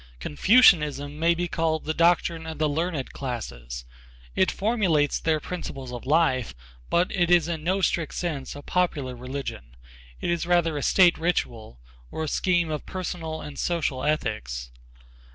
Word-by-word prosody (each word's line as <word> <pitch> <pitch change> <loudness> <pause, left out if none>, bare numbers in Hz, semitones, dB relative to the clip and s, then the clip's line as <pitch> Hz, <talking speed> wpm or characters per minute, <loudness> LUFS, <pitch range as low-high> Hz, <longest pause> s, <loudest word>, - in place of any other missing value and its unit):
Confucianism 150 - +4
may 170 +1 +3
be 175 +1 -2
called 160 -2 -1
the 155 - -1
doctrine 170 -1 +2
of 160 -1 -6
the 155 0 +1
learned 155 -1 -2
classes. 60 - -6 0.5
It 190 - +3
formulates 190 -9 +1
their 160 -1 +1
principles 135 -7 -6
of 120 +1 -7
life, 135 - +2 0.3
but 175 +1 +2
it 175 -3 +1
is 175 -2 +5
in 165 -3 -3
no 190 +4 +1
strict 170 -4 0
sense 150 -7 -3
a 145 - -9
popular 150 -9 -1
religion. 125 - -6 0.4
It - - -1
is 170 0 -1
rather 170 -3 +2
a 145 - -2
state 180 +2 +4
ritual, 115 - -2 0.3
or 160 - -4
a - - -2
scheme 175 +1 +1
of 150 - -4
personal 165 -4 -4
and 145 -1 -8
social 150 -7 -1
ethics. 65 - -2
160 Hz, 155 wpm, -25 LUFS, 135-175 Hz, 0.5 s, is